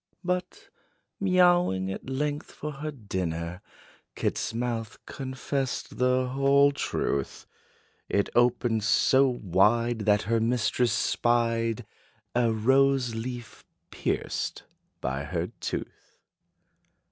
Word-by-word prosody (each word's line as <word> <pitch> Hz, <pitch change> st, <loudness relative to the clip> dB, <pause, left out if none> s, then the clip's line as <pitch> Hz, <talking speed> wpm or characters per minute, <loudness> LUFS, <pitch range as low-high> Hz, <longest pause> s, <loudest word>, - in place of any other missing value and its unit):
But, 180 Hz, 0 st, -3 dB, 0.5 s
mewing 175 Hz, -, +3 dB
at 95 Hz, -, -7 dB
length 145 Hz, +2 st, -2 dB
for 150 Hz, -, -6 dB
her 150 Hz, +2 st, -5 dB
dinner, 90 Hz, -, -4 dB, 0.5 s
Kit's -, -, -1 dB
mouth 115 Hz, -1 st, -3 dB
confessed 130 Hz, -1 st, -4 dB
the 125 Hz, 0 st, +2 dB
whole 140 Hz, +2 st, +4 dB
truth: 70 Hz, -, -2 dB, 0.6 s
It 100 Hz, -, +1 dB
opened 120 Hz, -2 st, +2 dB
so 130 Hz, +5 st, +4 dB
wide, 115 Hz, +2 st, +2 dB
that 105 Hz, -1 st, +4 dB
her 115 Hz, +2 st, +1 dB
mistress 120 Hz, +1 st, +1 dB
spied 115 Hz, -1 st, +1 dB, 0.5 s
A 120 Hz, -1 st, +2 dB
rose 130 Hz, +2 st, +3 dB
leaf 120 Hz, +1 st, -6 dB, 0.3 s
pierced -, -, -2 dB, 0.4 s
by 70 Hz, +2 st, -2 dB
her -, -, -3 dB
tooth. -, -, -6 dB
120 Hz, 100 wpm, -27 LUFS, 110-135 Hz, 0.6 s, whole